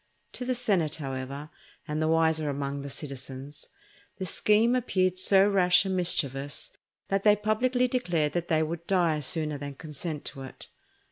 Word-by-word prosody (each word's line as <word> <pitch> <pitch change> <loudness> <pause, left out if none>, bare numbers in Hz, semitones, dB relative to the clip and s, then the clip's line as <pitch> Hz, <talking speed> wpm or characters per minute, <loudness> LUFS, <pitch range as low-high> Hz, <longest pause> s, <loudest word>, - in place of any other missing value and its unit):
To 250 - -5
the 255 0 0
senate, 190 -11 +1
however, 140 +1 -6 0.4
and 150 0 -2
the 155 - +1
wiser 160 -1 +2
among 140 0 -3
the 140 - -6
citizens, 135 0 -7 0.5
the 190 - -4
scheme 215 +6 +3
appeared 185 -6 0
so 195 +1 +5
rash 180 -2 +4
and 190 -1 -1
mischievous 145 -6 0 0.4
that 195 0 +1
they 210 -1 +6
publicly 245 +5 +1
declared 175 - 0
they 165 -2 +1
would 170 +1 -5
die 170 -5 +2
sooner 150 +1 -1
than 140 -1 -6
consent 150 +1 -6
to 140 -2 -6
it. 130 - -10
160 Hz, 155 wpm, -28 LUFS, 145-195 Hz, 0.5 s, they